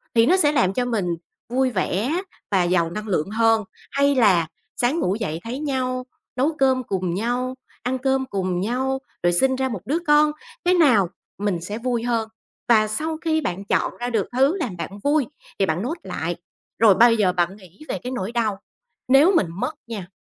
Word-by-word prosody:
thì 230 Hz, 0 st, +6 dB
nó 365 Hz, +9 st, +4 dB
sẽ 295 Hz, -6 st, +4 dB
làm 195 Hz, -10 st, +2 dB
cho 250 Hz, +4 st, 0 dB
mình 225 Hz, -6 st, -1 dB, 0.4 s
vui 260 Hz, +1 st, +1 dB
vẻ 230 Hz, -, 0 dB, 0.3 s
và 190 Hz, -3 st, +3 dB
giàu 175 Hz, -1 st, +2 dB
năng 215 Hz, +4 st, -5 dB
lượng 180 Hz, -3 st, 0 dB
hơn? 225 Hz, 0 st, +3 dB, 0.3 s
Hay 280 Hz, 0 st, +2 dB
là 190 Hz, -10 st, +4 dB, 0.3 s
sáng 255 Hz, +7 st, +1 dB
ngủ 195 Hz, -, +1 dB
dậy 180 Hz, -8 st, -3 dB
thấy 240 Hz, +4 st, -5 dB
nhau, 255 Hz, -3 st, -2 dB, 0.3 s
nấu 285 Hz, +5 st, +1 dB
cơm 260 Hz, -1 st, +3 dB
cùng 185 Hz, -5 st, -2 dB
nhau, 245 Hz, +6 st, -1 dB, 0.3 s
ăn 250 Hz, +2 st, -1 dB
cơm 265 Hz, 0 st, 0 dB
cùng 185 Hz, -6 st, -2 dB
nhau, 260 Hz, +5 st, -1 dB, 0.2 s
rồi 175 Hz, 0 st, +3 dB
sinh 260 Hz, +9 st, +3 dB
ra 265 Hz, 0 st, -1 dB
một 210 Hz, -6 st, -5 dB
đứa 290 Hz, +8 st, 0 dB
con, 300 Hz, 0 st, +5 dB, 0.3 s
cái 360 Hz, -, +4 dB
nào 250 Hz, -, +4 dB, 0.3 s
mình 200 Hz, -4 st, -1 dB
sẽ 205 Hz, +5 st, -5 dB
vui 235 Hz, -1 st, -1 dB
hơn? 230 Hz, -2 st, 0 dB, 0.4 s
Và 215 Hz, -2 st, +5 dB
sau 310 Hz, +9 st, -2 dB
khi 315 Hz, -1 st, +2 dB
bạn 195 Hz, -, -3 dB
chọn -, -, 0 dB
ra 245 Hz, 0 st, -2 dB
được 220 Hz, -5 st, 0 dB
thứ 270 Hz, +8 st, +3 dB
làm 235 Hz, -, -3 dB
bạn -, -, -4 dB
vui 290 Hz, -1 st, +2 dB, 0.3 s
thì 195 Hz, -, +4 dB
bạn 170 Hz, 0 st, -1 dB
note 305 Hz, -, -3 dB
lại. 175 Hz, -2 st, -3 dB, 0.4 s
Rồi 215 Hz, -4 st, +6 dB
bây 230 Hz, +1 st, +6 dB
giờ 190 Hz, -4 st, +2 dB
bạn 175 Hz, +1 st, 0 dB
nghĩ 185 Hz, -2 st, -18 dB
về -, -, -2 dB
cái 250 Hz, -, -4 dB
nỗi 210 Hz, -4 st, -3 dB
đau 225 Hz, -4 st, 0 dB, 0.5 s
nếu 280 Hz, +9 st, +6 dB
mình 195 Hz, -, +3 dB
mất 250 Hz, -, -3 dB
nha, 210 Hz, -6 st, -6 dB
235 Hz, 200 wpm, -23 LUFS, 195-265 Hz, 0.5 s, thì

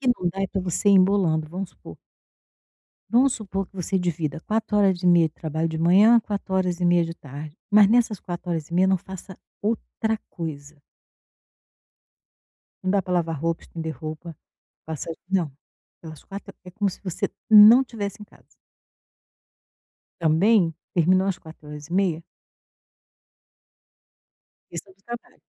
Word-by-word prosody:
que 260 Hz, -, +1 dB
não 180 Hz, -, 0 dB
dá 195 Hz, -, -6 dB
é -, -, +1 dB
para 195 Hz, +1 st, -3 dB
você 185 Hz, +3 st, 0 dB
ir -, -, +6 dB
embolando. 185 Hz, -5 st, +3 dB
Vamos 185 Hz, +3 st, -5 dB
supor -, -, -13 dB, 1.1 s
vamos 255 Hz, +3 st, +4 dB
supor 195 Hz, -2 st, -4 dB
que -, -, -20 dB
você 190 Hz, +1 st, -1 dB
divida 165 Hz, -4 st, -2 dB
4 215 Hz, +2 st, -1 dB
horas 195 Hz, -3 st, +2 dB
e -, -, 0 dB
meia 170 Hz, -2 st, +5 dB
de 155 Hz, -, -27 dB
trabalho 160 Hz, +1 st, -2 dB
de 160 Hz, 0 st, -4 dB
manhã, 195 Hz, +8 st, +6 dB
4 200 Hz, -3 st, -4 dB
horas 180 Hz, -2 st, 0 dB
e -, -, 0 dB
meia 175 Hz, -1 st, +4 dB
de 165 Hz, 0 st, -6 dB
tarde. 145 Hz, +1 st, -10 dB
Mas 205 Hz, -1 st, +7 dB
nessas 225 Hz, -3 st, +2 dB
4 175 Hz, 0 st, -6 dB
horas 160 Hz, -3 st, -3 dB
e 170 Hz, -, -7 dB
meia, 185 Hz, +2 st, +4 dB
não 190 Hz, 0 st, +3 dB
faça 190 Hz, 0 st, -10 dB, 0.3 s
outra 220 Hz, 0 st, -2 dB
coisa. 150 Hz, -3 st, -7 dB, 2.0 s
Não 185 Hz, -, +1 dB
dá 200 Hz, +1 st, +3 dB
pra 185 Hz, -1 st, -5 dB
lavar 165 Hz, -3 st, -1 dB
roupa, 165 Hz, +2 st, -2 dB
estender 160 Hz, -1 st, -6 dB
roupa, 155 Hz, +1 st, -8 dB, 0.5 s
passar 160 Hz, +1 st, -5 dB
de -, -, -14 dB, 0.2 s
não, 165 Hz, -6 st, -2 dB, 0.5 s
pelas 155 Hz, -2 st, -11 dB
4 195 Hz, 0 st, -9 dB
é 180 Hz, -, -10 dB
como 200 Hz, +2 st, -1 dB
se -, -, -11 dB
você 185 Hz, -4 st, -3 dB, 0.2 s
não 220 Hz, +5 st, +9 dB
tivesse 210 Hz, -4 st, -6 dB
em -, -, -8 dB
casa. -, -, -23 dB, 1.8 s
Também 170 Hz, +2 st, +3 dB, 0.2 s
terminou 185 Hz, +3 st, +3 dB
às 195 Hz, -2 st, -1 dB
4 160 Hz, -2 st, -14 dB
horas 150 Hz, 0 st, -9 dB
e -, -, -11 dB
meia 180 Hz, -4 st, +1 dB, 2.5 s
Questão 180 Hz, +3 st, -8 dB
do 195 Hz, -, -36 dB
trabalho. 240 Hz, +2 st, -9 dB
180 Hz, 160 wpm, -24 LUFS, 165-200 Hz, 2.5 s, não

